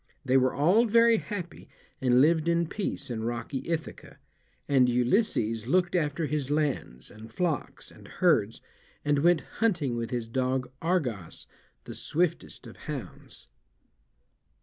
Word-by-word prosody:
They 130 0 +2
were 130 -1 +3
all 180 - +4
very 230 +1 +5
happy, 185 -5 -7 0.3
and 125 -1 +4
lived 160 +2 +3
in 170 0 +2
peace 155 -7 -4
in 110 -2 -3
rocky 120 +3 -3
Ithaca, 165 -1 -5 0.5
and 130 -3 +4
Ulysses 120 - +1
looked 180 +4 +2
after 160 -2 0
his 145 -2 -2
lands, 145 - -2
and 110 +1 -12
flocks, 165 +4 -3
and - - -15
herds, - - +1 0.4
and 145 -1 +2
went 170 +2 +4 0.2
hunting 165 - +1
with 115 -1 -3
his 120 -3 -3
dog 130 +1 -1
Argos, 125 - -2 0.4
the - - -8
swiftest 170 +1 -2
of - - -12
hounds. 150 -6 -8
145 Hz, 135 wpm, -28 LUFS, 125-170 Hz, 0.5 s, very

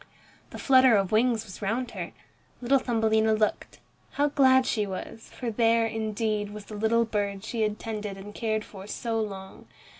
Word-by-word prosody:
The - - -9
flutter 260 -4 +5
of 195 -2 0
wings 225 0 +2
was 190 -1 -11
round 230 +5 -2
her. - - -6 0.5
Little 265 +2 +3
Thumbelina 220 -2 +2
looked. 215 -1 -1 0.4
How 290 +1 +2
glad 260 -2 +4
she 210 -4 0
was, 195 +4 -7
for 240 -3 -4
there, 230 +1 +3
indeed, 215 -1 -2
was 210 -1 -9
the 215 - -9
little 225 +2 +2
bird 200 -3 -2
she 225 0 -3
had 210 -1 0
tended 210 -3 -5
and 205 +2 -10
cared 215 -1 -2
for 195 -1 -11
so 225 +1 -2
long. 195 -3 -7
220 Hz, 175 wpm, -27 LUFS, 210-230 Hz, 0.5 s, flutter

